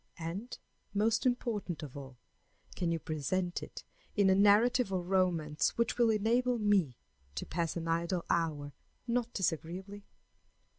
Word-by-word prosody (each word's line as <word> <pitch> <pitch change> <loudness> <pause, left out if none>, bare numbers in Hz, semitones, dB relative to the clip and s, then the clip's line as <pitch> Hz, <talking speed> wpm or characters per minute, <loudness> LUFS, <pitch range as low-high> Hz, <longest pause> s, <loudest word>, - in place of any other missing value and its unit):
And, 180 +8 -5 0.4
most 220 +4 +2
important 210 - -2
of 140 -4 -8
all, 135 -3 -9 0.6
can 175 - -1
you 165 - +1
present 175 +4 -2
it - - -9 0.3
in 200 -2 +4
a - - +6
narrative 210 +3 +4
or 185 -2 -1
romance 175 -5 +1
which 235 +1 0
will 235 -1 +5
enable 235 +4 +2
me 200 - +2 0.4
to - - -3
pass 170 0 -2
an 165 -1 -4
idle 170 +2 0
hour 150 -4 -1 0.3
not 240 -1 0
disagreeably? 190 +3 -3
185 Hz, 140 wpm, -32 LUFS, 165-215 Hz, 0.6 s, a